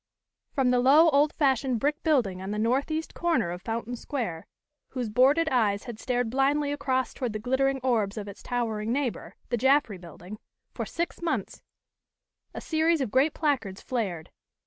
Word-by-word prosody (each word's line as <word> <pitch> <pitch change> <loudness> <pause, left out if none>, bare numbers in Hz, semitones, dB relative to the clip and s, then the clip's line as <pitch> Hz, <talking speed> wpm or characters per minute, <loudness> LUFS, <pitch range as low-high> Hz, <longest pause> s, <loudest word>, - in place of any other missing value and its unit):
From 265 -3 +2
the 250 - +3
low, 290 +6 +6
old 290 +1 +4
fashioned 265 -4 +1
brick 295 +6 0
building 235 - +1
on 190 - -5
the 210 - -3
northeast 275 +8 -1
corner 315 - 0
of 180 +1 -6
Fountain 230 +4 -4
Square, 225 - -4 0.4
whose 250 -4 -4
boarded 275 +8 +4
eyes 210 -6 +1
had 235 -3 -8
stared 245 -2 -1
blindly 285 +2 +1
across 260 -3 -1
toward 245 -5 -3
the - - -2
glittering 270 +4 +1
orbs 225 -5 0
of 205 -1 -5
its 200 - -10
towering 225 -3 -2
neighbor, 240 -9 -2
the 240 - 0
Jaffry 265 -5 +2
Building, 180 +4 -11 0.3
for - - -4
six 340 +1 -4
months, 340 -1 -3 0.9
a - - -7
series 320 +1 +1
of 260 -6 -2
great 275 +5 +2
placards 260 -11 -1
flared. 195 -10 -3
250 Hz, 170 wpm, -27 LUFS, 215-285 Hz, 0.9 s, low